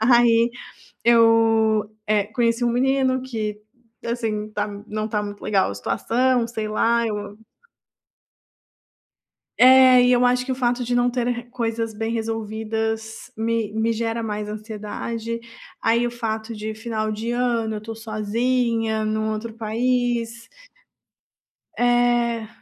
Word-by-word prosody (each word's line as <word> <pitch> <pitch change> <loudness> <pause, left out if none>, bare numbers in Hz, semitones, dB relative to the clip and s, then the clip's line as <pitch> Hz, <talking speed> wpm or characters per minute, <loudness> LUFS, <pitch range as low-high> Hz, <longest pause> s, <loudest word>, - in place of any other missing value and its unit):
Aí 235 0 +5 0.5
eu, 225 -2 +4 0.2
eh, 210 -1 +2
conheci 235 0 +2
um 240 - +2
menino 260 +1 +2
que, 215 -4 -4 0.4
assim, 220 -3 -2
tá 210 0 -1 0.2
não 215 +1 -3
tá 210 -1 -1
muito 205 0 -7
legal 195 -2 +2
a - - -5
situação, 235 - +1
sei 220 -2 -4
lá, 230 +2 +2
eu 205 -1 -5 2.2
É, 255 -1 +8
e 250 - +4
eu 245 0 +4
acho 250 0 +2
que 265 - -3
o - - -1
fato 245 -1 0
de 245 +1 -2
não 245 0 +3
ter 245 -1 -1
r 240 -1 -2
coisas 230 -2 -3
bem 225 +2 -3
resolvidas 220 0 -3
me 225 -1 -1
me 220 +1 +1
gera 230 +1 -2
mais 210 -1 -3
ansiedade. 220 +2 -5 0.4
Aí 235 +1 +2
o 240 - -2
fato 225 -1 -4
de 215 +1 -5
final 220 -1 -3
de 225 +3 -3
ano, 235 -3 0
eu - - -7
tô 225 +1 -7
sozinha, 225 +1 -1
num 215 0 -1
outro 225 +1 -5
país 235 +1 -1 1.3
É. 240 -2 +2
225 Hz, 135 wpm, -22 LUFS, 215-240 Hz, 2.2 s, É